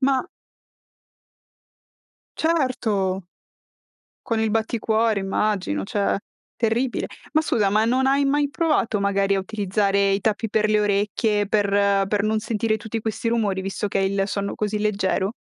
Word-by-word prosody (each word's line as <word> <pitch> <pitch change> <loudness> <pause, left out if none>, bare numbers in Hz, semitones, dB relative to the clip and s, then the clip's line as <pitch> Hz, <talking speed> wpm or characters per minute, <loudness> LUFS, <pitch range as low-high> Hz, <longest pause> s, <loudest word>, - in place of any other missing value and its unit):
Ma 265 -1 +1 2.1
Certo. 220 - 0 1.0
Con 225 -3 0
il 220 -1 +1
batticuore 220 -1 +1
immagino, 195 - -1
cioè 200 - 0 0.4
terribile. 235 +2 0 0.3
Ma 310 - +4
scusa, 210 -10 +1
ma 215 +2 +3
non 260 +3 +2
hai 275 +1 +3
mai 285 +1 +1
provato, 290 -10 +1
magari, 200 0 +1
a - - +1
utilizzare 200 0 0
i 195 +1 +1
tappi 220 +2 0
per 215 0 +2
le 215 0 +3
orecchie, 205 +1 +1
per 205 -1 +2 0.4
per 205 0 +1
non 215 +1 +1
sentire 220 0 -1
tutti 220 +1 -5
questi 220 +1 -2
rumori 210 -5 0
visto 195 +2 -3
che - - -1
hai 195 0 +1
il 195 -1 0
sonno 200 0 -3
così 210 0 -2
leggero? 200 -1 0
215 Hz, 145 wpm, -23 LUFS, 200-230 Hz, 2.1 s, Ma